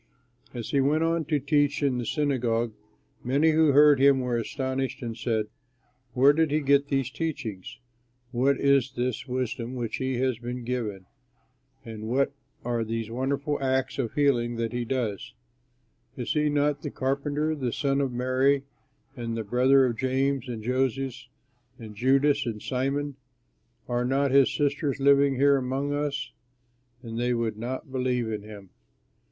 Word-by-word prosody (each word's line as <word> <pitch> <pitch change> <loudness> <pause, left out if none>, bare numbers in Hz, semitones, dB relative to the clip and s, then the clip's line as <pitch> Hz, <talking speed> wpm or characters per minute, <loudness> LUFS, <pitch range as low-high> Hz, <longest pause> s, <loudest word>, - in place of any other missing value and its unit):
As 120 -3 -6
he 140 - +3
went 150 +4 +2
on 165 -1 0
to 150 0 +1
teach 145 +1 +1
in 130 -3 +1
the 120 - -4
synagogue, 120 -6 0 0.5
many 145 +6 +3
who 155 -1 +4
heard 145 0 +6
him 140 0 +5
were 125 -1 -1
astonished 130 +2 -3
and 115 -1 -4
said: 110 -2 -1 0.7
"Where 135 +3 +6
did 160 +1 +2
he 150 +2 +1
get 140 0 +3
these 135 -2 -1
teachings? 130 - -5 0.5
What 130 +2 +2
is 140 -1 +3
this 125 +1 -2
wisdom 125 -1 -3
which 120 -3 -3
has 130 -2 -1
been 125 +1 -5
given 115 -5 -3
him? - - -27 0.8
and 110 -2 -8
what 135 +4 +1 0.3
are 120 -1 0
these 115 0 -4
wonderful 140 +4 -2
acts 130 0 0
of 120 -4 -2
healing 120 -5 +2
that 115 0 -3
he 120 0 -2
does? 115 -5 -3 0.8
Is 125 - -2
he 150 -1 +2
not 145 0 +1
the - - -4
carpenter, 145 +3 -1
the 130 -6 -2
son 140 +2 0
of 135 -2 -1
Mary 130 +3 +1 0.5
and 115 -2 -4
the 110 - -2
brother 130 +5 +4
of 120 -3 -1
James 130 0 0
and 115 -3 -5
Joses 130 +1 -1 0.5
and 110 -3 -10
Judas 135 +4 +2
and 110 -2 -3
Simon? 135 +3 -2 0.7
Are 120 0 0
not 135 +2 +1
his 135 -1 +5
sisters 145 -1 -1
living 140 0 +4
here 140 +1 +4
among 135 +2 -2
us?" 145 -2 -2 0.7
And 115 -1 -5
they 120 0 +1
would 110 -2 -2
not 130 +4 -5
believe 125 -3 -1
in 105 - -3
him. 100 -3 -12
130 Hz, 160 wpm, -26 LUFS, 120-140 Hz, 0.8 s, heard